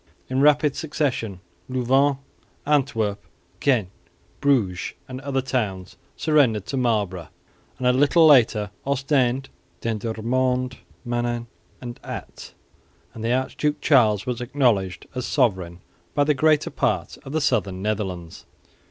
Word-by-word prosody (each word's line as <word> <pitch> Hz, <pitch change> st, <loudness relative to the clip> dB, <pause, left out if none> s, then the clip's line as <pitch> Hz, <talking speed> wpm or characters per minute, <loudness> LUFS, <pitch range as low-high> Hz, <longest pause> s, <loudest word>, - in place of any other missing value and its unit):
In 130 Hz, +1 st, +1 dB
rapid 150 Hz, 0 st, +4 dB
succession 135 Hz, -, -2 dB, 0.3 s
Louvain, 130 Hz, +2 st, +2 dB, 0.5 s
Antwerp, 120 Hz, -9 st, 0 dB, 0.4 s
Ghent, 120 Hz, -10 st, +2 dB, 0.5 s
Bruges 110 Hz, -11 st, +1 dB
and 130 Hz, 0 st, -7 dB
other 135 Hz, -2 st, -1 dB
towns 105 Hz, -8 st, -2 dB, 0.2 s
surrendered 130 Hz, -, +2 dB
to 120 Hz, -, -4 dB
Marlborough, 105 Hz, -, 0 dB, 0.5 s
and 130 Hz, -, -4 dB
a 125 Hz, -, +5 dB
little 145 Hz, +5 st, +5 dB
later 115 Hz, -8 st, +5 dB
Ostend, 135 Hz, -1 st, +1 dB, 0.3 s
Dendermonde, 120 Hz, +4 st, -1 dB, 0.3 s
Menin 120 Hz, -1 st, -1 dB, 0.3 s
and 120 Hz, -1 st, -8 dB
Ath; -, -, -8 dB, 0.6 s
and 110 Hz, -, -8 dB
the 115 Hz, -, 0 dB
Archduke 130 Hz, +3 st, 0 dB
Charles 110 Hz, -8 st, +4 dB
was 125 Hz, -1 st, -3 dB
acknowledged 120 Hz, -8 st, 0 dB
as 125 Hz, -1 st, -3 dB
sovereign 95 Hz, -, 0 dB, 0.3 s
by 145 Hz, -, +4 dB
the 150 Hz, +1 st, +3 dB
greater 155 Hz, +2 st, +2 dB
part -, -, -1 dB
of 135 Hz, -, -8 dB
the 160 Hz, -, 0 dB
southern 100 Hz, -10 st, 0 dB
Netherlands. 95 Hz, -6 st, -4 dB
125 Hz, 120 wpm, -23 LUFS, 105-140 Hz, 0.6 s, a